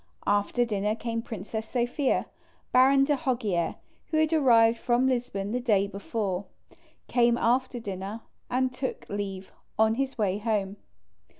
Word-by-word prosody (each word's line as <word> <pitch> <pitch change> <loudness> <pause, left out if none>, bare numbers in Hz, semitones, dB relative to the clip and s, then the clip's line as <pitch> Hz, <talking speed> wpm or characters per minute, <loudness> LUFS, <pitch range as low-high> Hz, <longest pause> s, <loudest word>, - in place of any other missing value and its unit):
After 205 +4 +2
dinner 210 -1 -1
came 230 0 -3
Princess 220 0 -6
Sophia. 250 +3 0 0.5
Baron 270 +2 +6
de 290 +1 +2
Hoggier, 235 - -1 0.3
who 315 - -1
had 315 +1 +2
arrived 235 -6 +5
from 245 +1 +2
Lisbon 240 -6 -1
the 250 - 0
day 210 -5 +2
before, 200 -1 -3 0.6
came 240 -1 +3
after 250 +1 +1
dinner, 200 +1 -5 0.3
and 255 0 0
took 260 +1 -4
leave, 195 -2 -5 0.3
on 220 0 +4
his 270 +2 -2
way 200 -2 0
home. 205 -2 -1
230 Hz, 135 wpm, -27 LUFS, 205-255 Hz, 0.6 s, Baron